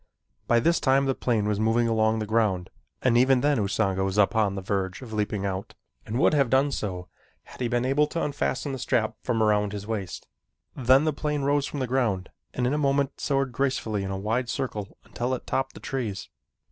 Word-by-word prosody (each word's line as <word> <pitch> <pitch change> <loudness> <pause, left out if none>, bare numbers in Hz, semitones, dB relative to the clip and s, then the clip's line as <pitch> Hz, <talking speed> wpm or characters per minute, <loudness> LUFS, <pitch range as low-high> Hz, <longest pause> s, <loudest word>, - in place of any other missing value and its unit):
By 120 - +4
this 170 +8 +2
time 135 +1 +3
the 135 - +1
plane 115 -5 0
was 105 -1 0
moving 115 +2 +2
along 110 0 +2
the 110 - -2
ground 105 -5 0 0.3
and 125 -2 +3
even 130 +1 +4
then 145 -1 +2
Usanga 95 -1 0
was 95 +1 -1
upon 105 0 +3
the 95 - -4
verge 95 +3 -2
of 115 -3 -9
leaping 105 -1 -1
out, 95 0 -4 0.3
and 110 - -2
would 140 - +4
have 140 -4 +3
done 135 +3 +3
so 90 -8 -4 0.4
had - - -13
he 125 - +1
been 120 +1 0
able 140 +3 +3
to 165 +2 -3
unfasten 145 -1 -2
the 135 - -4
strap 120 -3 0
from 115 -2 0
about 105 -1 +2
his 105 -1 -5
waist. 105 -5 -4 0.5
Then 130 +2 +4
the 155 - +1
plane 150 0 -2
rose 145 0 +1
from 145 - -5
the - - +1
ground 115 -8 0 0.2
and 125 - -1
in 125 - +1
a 150 - 0
moment 140 -1 0
soared 135 -2 0
gracefully 120 -5 -1
in 95 - -4
a 95 - -3
wide 115 +5 -1
circle 110 -7 -4
until 125 +2 -2
it - - -9
topped 135 0 -2
the - - -9
trees. 115 -7 -4
120 Hz, 215 wpm, -26 LUFS, 105-135 Hz, 0.5 s, By